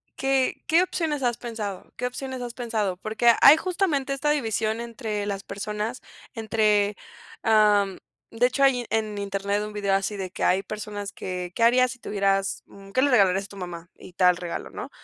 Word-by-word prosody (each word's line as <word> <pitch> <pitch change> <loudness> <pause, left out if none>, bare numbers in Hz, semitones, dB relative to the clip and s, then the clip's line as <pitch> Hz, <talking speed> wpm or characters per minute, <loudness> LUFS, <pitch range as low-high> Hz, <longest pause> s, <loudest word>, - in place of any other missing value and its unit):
¿qué 270 -1 0
qué 335 +3 +5
opciones 315 -6 -2
has 240 -1 +1
pensado? 215 -5 -6
¿Qué 250 - -3
opciones 260 0 -6
has 240 -1 -5
pensado?, 220 -7 -2
porque 220 +4 +3
hay 290 +3 +9
justamente 325 -7 0
esta 295 +2 0
división 225 -4 -1
entre 220 -3 -4
las 200 -1 -4
personas, 210 +4 -4 0.3
entre, 210 -2 +1 0.5
am, 210 -3 +3 0.3
de 235 +2 +3
hecho, 275 +2 0
hay 250 -3 +3
en 215 -2 -1
Internet 200 +1 -1
un 210 0 -6
vídeo 200 -2 0
así 195 +1 0
de 185 -1 -5
que - - -5
hay 190 +2 +3
personas 205 0 -6
que, 180 -1 -5
¿qué - - -4
harías 250 +1 +5
si 260 - -10
tuvieras? 195 -2 0 0.3
¿Qué 260 - +3
le 280 - +3
regalarías 195 -4 +4
a - - -12
tu 200 - -13
mamá?, 175 -1 -7
y 180 - -14
tal 180 -1 +4
regalo, 175 -1 -6
¿no? - - -7
215 Hz, 185 wpm, -25 LUFS, 195-250 Hz, 0.5 s, hay